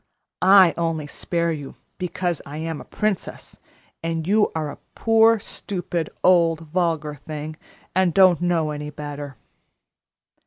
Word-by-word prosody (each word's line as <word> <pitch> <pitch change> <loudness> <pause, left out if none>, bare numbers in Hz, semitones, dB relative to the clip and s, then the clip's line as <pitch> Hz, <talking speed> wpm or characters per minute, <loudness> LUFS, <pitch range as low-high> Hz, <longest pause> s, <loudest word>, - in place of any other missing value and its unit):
I 190 -2 +7
only 165 -2 -1
spare 170 +3 -1
you 145 -4 -6 0.2
because 180 -2 -2
I 145 +2 -8
am 160 -1 -4
a - - -12
princess, 210 -3 -3 0.4
and 165 -1 -2
you 210 +3 +3
are 155 -2 -2
a - - -12 0.2
poor, 225 0 +5
stupid, 175 -5 -4
old, 170 -3 +4
vulgar 160 -2 -1
thing, 150 +1 -7 0.4
and 185 -1 +3
don't 185 -1 +5
know 170 -3 +1
any 150 0 -5
better." 145 -3 -7
165 Hz, 130 wpm, -23 LUFS, 150-185 Hz, 0.4 s, I